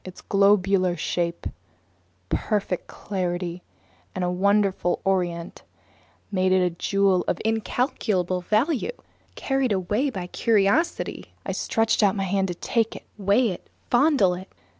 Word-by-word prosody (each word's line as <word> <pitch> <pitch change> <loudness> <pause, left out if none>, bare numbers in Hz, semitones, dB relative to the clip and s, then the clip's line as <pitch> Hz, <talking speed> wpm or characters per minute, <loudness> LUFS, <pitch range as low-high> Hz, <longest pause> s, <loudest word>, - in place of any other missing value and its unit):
Its 185 -1 -10
globular 195 -2 +3
shape, 170 +1 -2 0.8
perfect 195 - -1
clarity, 180 -2 -3 0.5
and 180 -1 -2
wonderful 200 -3 +2
orient 175 -3 -1 0.7
made 185 -1 +1
it 185 - +4
a 180 - +1
jewel 195 +1 +1
of - - 0
incalculable 215 - 0
value. 240 - +1 0.5
Carried 270 -3 0
away 205 +8 0
by 190 -8 -5
curiosity, 220 - 0
I - - -2
stretched 225 0 +1
out 200 -1 +3
my 195 - -1
hand 195 0 0
to 175 - -4
take 225 +5 -1
it, - - -9 0.2
weigh 205 +5 +3
it, 180 - -7 0.2
fondle 250 - +4
it! 185 +2 -8
195 Hz, 125 wpm, -24 LUFS, 180-215 Hz, 0.8 s, it